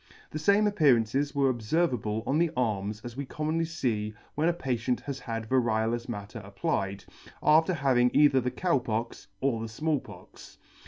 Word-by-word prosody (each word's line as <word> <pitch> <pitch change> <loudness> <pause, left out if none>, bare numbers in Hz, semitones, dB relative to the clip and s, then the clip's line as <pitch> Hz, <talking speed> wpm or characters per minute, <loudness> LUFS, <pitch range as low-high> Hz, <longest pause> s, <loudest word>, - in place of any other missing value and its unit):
The 155 - -4
fame 200 +6 +4
appearances 140 - +2
were 135 -2 +3
obferv 130 +8 0
able 110 -1 -2
on 145 +4 +1
the 170 0 +3
arms 105 -3 -1
as 120 -1 -7
we 140 - -3
commonly 155 +4 -2
fee 115 -10 -2 0.2
when 155 +3 +1
a - - +2
patient 125 -6 -2
has 140 -2 -5
had 115 -3 -5
variolous 115 -1 0
matter 105 0 -6
applied, 100 0 -3 0.4
after 160 +4 +4
having 130 -4 +3
either 145 -3 +5
the 125 - -1
Cow 170 0 +1
Pox 115 0 -4
or 130 -4 0
the 115 - -5
Small 150 +6 0
Pox. - - -14
125 Hz, 170 wpm, -28 LUFS, 110-150 Hz, 0.4 s, either